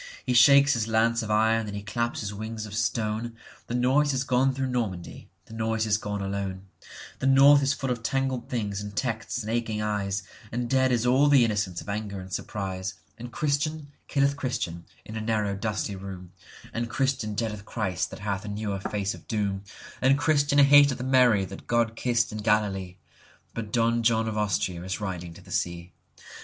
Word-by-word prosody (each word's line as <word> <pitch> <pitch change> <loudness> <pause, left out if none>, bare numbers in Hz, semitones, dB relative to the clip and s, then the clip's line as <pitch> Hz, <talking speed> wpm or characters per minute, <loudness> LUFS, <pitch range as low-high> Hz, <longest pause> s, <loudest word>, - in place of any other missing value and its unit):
He 125 - 0
shakes 140 +3 +7
his 115 -2 -1
lance 115 +1 +2
of 110 - -5
iron 110 +1 +2
and 100 - -5
he 100 - -5
claps 115 +3 -2
his 105 -1 -4
wings 110 +1 -5
of 105 - -9
stone; 115 +1 -1 0.3
The 120 - -3
noise 135 +4 +3
is 130 0 0
gone 135 0 +2
through 135 0 -2
Normandy; 105 -8 -4 0.2
the - - -13
noise 110 0 -1
is 110 0 +2
gone 105 -1 -4
alone; 95 -1 -3 0.6
The 135 - 0
North 140 +2 +7
is 135 0 +2
full 130 0 -2
of 120 -2 -2
tangled 130 0 -1
things 105 -5 -2
and 105 -1 -7
texts 115 0 -2
and 110 - -4
aching 115 -2 -1
eyes, 100 -2 -1 0.3
And 120 +1 -2
dead 130 +1 +2
is 120 -1 +1
all 130 +4 +4
the 140 -4 +6
innocence 105 -5 -1
of - - -13
anger 100 -1 -4
and 95 0 -9
surprise, 95 -2 -4 0.2
And 120 +1 -7
Christian 150 +1 -1 0.2
killeth 140 0 +1
Christian 110 - -3 0.2
in 110 - -8
a 110 - -3
narrow 110 -2 0
dusty 105 0 -2
room, 95 -2 -8 0.4
And 115 +1 -2
Christian 130 -4 -1
dreadeth 105 -2 -3
Christ 100 -7 -2
that - - -10
hath 100 -1 -2
a - - -8
newer 105 -1 -3
face 100 +1 -2
of - - -13
doom, 100 -3 -1 0.4
And 135 +2 +4
Christian 145 -2 +2
hateth 140 -2 +6
Mary 125 -6 +4
that 95 0 -10
God 115 -1 +1
kissed 120 -1 +1
in 105 - -5
Galilee,—But 100 -1 -3
Don 115 0 +2
John 115 -1 +2
of 110 - -3
Austria 95 -4 -1
is 95 +2 -3
riding 90 -4 -5
to - - -13
the - - -15
sea. 85 0 -3
110 Hz, 190 wpm, -27 LUFS, 100-125 Hz, 0.6 s, shakes